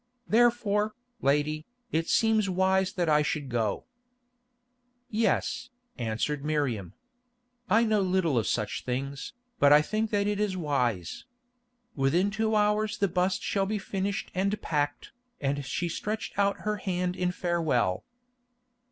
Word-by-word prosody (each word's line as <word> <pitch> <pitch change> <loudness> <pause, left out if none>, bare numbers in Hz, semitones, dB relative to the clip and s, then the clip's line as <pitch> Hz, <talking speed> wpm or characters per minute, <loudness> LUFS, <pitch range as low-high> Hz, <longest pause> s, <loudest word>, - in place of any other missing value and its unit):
Therefore, 220 -2 +2 0.3
lady, 150 +2 +1 0.2
it 165 +1 0
seems 220 -3 +3
wise 190 +1 +2
that 175 -3 0
I 150 -1 +4
should 145 -2 -2
go." 115 -4 -1 1.3
"Yes," 225 +3 0 0.3
answered 120 +5 -2
Miriam. 135 - -1 0.8
"I 220 +4 +5
know 215 -2 +2
little 185 -5 +1
of 115 - +1
such 105 -3 -1
things, 135 - -4 0.3
but 140 - +6
I 150 +1 +7
think 215 +6 -1
that 200 -1 +1
it 205 0 0
is 205 -3 0
wise. 125 - -1 0.7
Within 165 +9 +2
two 220 +1 0
hours 210 0 +2
the 200 - +2
bust 185 +1 0
shall 195 -1 0
be 215 +1 -1
finished 195 0 -3
and 195 +3 0
packed," 145 -2 -2 0.3
and 140 0 -1
she 165 +7 -2
stretched 210 +6 -3
out 200 0 +2
her 210 0 -1
hand 180 -2 -2
in 180 -1 0
farewell. 155 - 0
180 Hz, 135 wpm, -28 LUFS, 145-205 Hz, 1.3 s, I